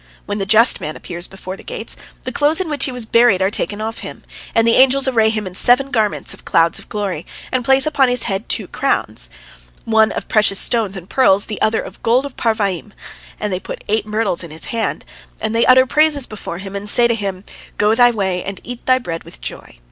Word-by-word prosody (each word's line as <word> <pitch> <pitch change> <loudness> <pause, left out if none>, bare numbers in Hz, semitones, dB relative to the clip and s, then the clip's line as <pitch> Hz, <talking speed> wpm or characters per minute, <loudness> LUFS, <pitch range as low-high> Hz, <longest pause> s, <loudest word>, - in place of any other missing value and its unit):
When 205 0 -3
the 195 - -2
just 225 +4 +5
man 155 - -5
appears 175 0 -6
before 190 -1 -8
the - - -13
gates, - - -3 0.3
the 255 - -4
clothes 295 +6 +2
in 360 -4 -2
which 290 - 0
he 265 - -3
was 250 -2 -4
buried 230 -3 +4
are 190 +1 +1
taken 210 0 -2
off 225 +1 -4
him, - - -9 0.3
and 225 - +4
the 230 - +5
angels 265 +1 +5
array 225 -4 +3
him 215 -2 -2
in 185 - -6
seven 250 +8 +3
garments 215 -3 0
of - - -15
clouds 165 0 +2
of - - -14
glory, 195 -6 -3 0.3
and 255 -1 0
place 265 +2 +4
upon 285 -4 +2
his 245 -1 +1
head 195 +3 -3
two - - 0
crowns, - - -2 0.6
one 220 -1 +3
of - - -5
precious 210 -3 +3
stones 215 -5 -1
and 180 -1 -9
pearls, 200 -7 +3
the 215 - -6
other 220 +1 +2
of - - -11
gold 245 +4 +2
of 280 - -8
Parvaim, 210 -4 -1 0.5
and 210 -2 -2
they 180 - -1
put - - -8
eight 215 0 0
myrtles 210 -5 -1
in 170 - -7
his 155 +1 -6
hand, 230 -1 -2 0.3
and 220 0 -2
they 230 - +3
utter 260 0 +7
praises 300 0 +2
before 205 -5 -7
him 195 +1 -8
and 200 +1 -3
say 240 +3 +4
to 235 - +1
him, 195 -4 -4 0.3
"Go 210 +1 +3
thy 245 +1 +6
way, 190 -6 -1
and 195 0 -6
eat 245 0 -8
thy 255 0 +5
bread 165 -9 -5
with - - -13
joy." - - -9
220 Hz, 230 wpm, -18 LUFS, 195-245 Hz, 0.6 s, utter